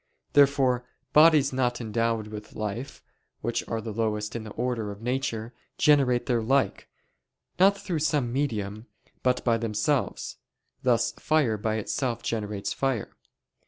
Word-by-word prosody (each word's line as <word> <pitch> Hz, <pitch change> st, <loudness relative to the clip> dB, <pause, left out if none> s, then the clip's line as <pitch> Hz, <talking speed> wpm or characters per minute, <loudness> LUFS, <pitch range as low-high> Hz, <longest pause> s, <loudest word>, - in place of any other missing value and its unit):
Therefore 135 Hz, -3 st, +4 dB, 0.3 s
bodies 150 Hz, -3 st, +6 dB
not 125 Hz, -2 st, 0 dB
endowed 115 Hz, -1 st, -1 dB
with 105 Hz, 0 st, -9 dB
life, 110 Hz, +5 st, -5 dB, 0.4 s
which 120 Hz, 0 st, -1 dB
are 115 Hz, -, -2 dB
the 110 Hz, -1 st, -5 dB
lowest 105 Hz, -1 st, -1 dB
in 115 Hz, -, -3 dB
the 110 Hz, -, -8 dB
order 120 Hz, -3 st, -2 dB
of 100 Hz, 0 st, -7 dB
nature, 125 Hz, -2 st, -2 dB, 0.2 s
generate 135 Hz, -5 st, +4 dB
their 120 Hz, -3 st, +1 dB
like, 135 Hz, +4 st, +1 dB, 0.7 s
not 195 Hz, +2 st, +6 dB
through 190 Hz, -5 st, -3 dB
some 145 Hz, -5 st, 0 dB
medium, 110 Hz, -5 st, -2 dB, 0.3 s
but 125 Hz, -1 st, +1 dB
by 115 Hz, -2 st, +3 dB
themselves; 115 Hz, +5 st, -1 dB, 0.4 s
thus 120 Hz, -1 st, +2 dB
fire 150 Hz, -8 st, +2 dB
by 110 Hz, +1 st, -1 dB
itself 115 Hz, +2 st, -2 dB
generates 105 Hz, -3 st, -2 dB
fire. 135 Hz, -6 st, -2 dB
120 Hz, 135 wpm, -27 LUFS, 110-135 Hz, 0.7 s, bodies